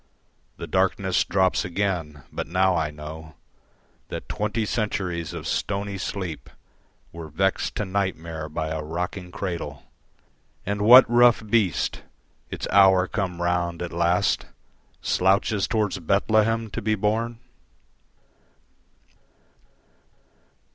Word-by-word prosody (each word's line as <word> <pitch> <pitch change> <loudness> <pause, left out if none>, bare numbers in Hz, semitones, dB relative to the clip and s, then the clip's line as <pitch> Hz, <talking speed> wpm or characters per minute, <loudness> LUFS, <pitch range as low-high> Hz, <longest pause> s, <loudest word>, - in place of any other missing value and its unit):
The - - -6
darkness 95 0 +1
drops 95 -1 +1
again; 85 -7 -2
but - - -4
now 95 +1 +2
I 80 -2 0
know 80 +1 -9 0.7
That - - -7
twenty 105 +1 -2
centuries 95 -7 -2
of - - -7
stony 100 -1 -2
sleep 90 -5 -5 0.6
Were 85 -1 -8
vexed 95 +6 -1
to 105 - -2
nightmare 85 -5 -3
by 80 +1 -3
a 80 0 -3
rocking 90 +4 -4
cradle, 85 -8 -5 0.8
And 100 +1 -2
what 125 +5 +9
rough 120 -2 +4
beast, 105 -5 +1 0.5
its - - -5
hour 95 -1 +6
come 90 -5 -3
round 85 -1 -1
at 85 - -6
last, 85 +1 +1 0.6
Slouches 95 +2 +2
towards 105 -4 0
Bethlehem 110 +5 +1
to - - -4
be 110 +1 +1
born? 110 +3 -1
95 Hz, 110 wpm, -24 LUFS, 85-105 Hz, 0.8 s, what